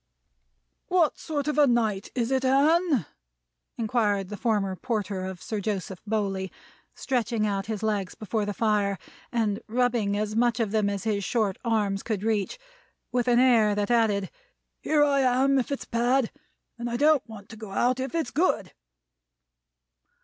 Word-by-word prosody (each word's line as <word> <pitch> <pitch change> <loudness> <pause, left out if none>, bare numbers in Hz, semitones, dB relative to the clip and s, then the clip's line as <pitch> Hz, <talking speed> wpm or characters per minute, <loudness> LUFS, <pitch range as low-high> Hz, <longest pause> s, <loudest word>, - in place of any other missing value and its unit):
"What 355 -4 +2
sort 295 -2 -3
of 300 0 0
a 290 - +6
night 220 -5 +1
is 240 0 -1
it, 265 0 +1
Anne?" 285 - +3 0.7
inquired 210 -4 0
the 210 - -5
former 205 -4 0
porter 205 -4 -3
of 190 -3 -7
Sir 220 -3 -3
Joseph 190 -3 -3
Bowley, 195 -3 -1 0.4
stretching 235 -4 -1
out 195 -1 -2
his 220 -1 -4
legs 205 -4 -1
before 215 +1 -2
the 205 0 -2
fire, 210 -3 +1 0.3
and 220 -4 0
rubbing 235 -3 +1
as 215 0 -2
much 235 0 +2
of 220 -3 0
them 215 -2 +1
as 200 -1 -3
his 210 -3 -1
short 210 -2 0
arms 210 -4 0
could 210 -4 -3
reach; 215 - 0 0.5
with 245 -1 0
an 240 -1 +4
air 230 -5 +4
that 205 +3 -1
added, 210 -5 +2 0.5
"Here 300 -1 +2
I 280 -1 +3
am 265 +1 +3
if 260 +3 -3
it's 280 - -3
bad, 240 +1 +1 0.5
and 240 0 -3
I 235 - -2
don't 295 -3 +3
want 205 -3 -10
to 225 - -9
go 215 -1 -9
out 245 +6 +1
if 265 +3 -3
it's 325 -2 -1
good." 300 - 0
225 Hz, 165 wpm, -26 LUFS, 205-255 Hz, 0.7 s, a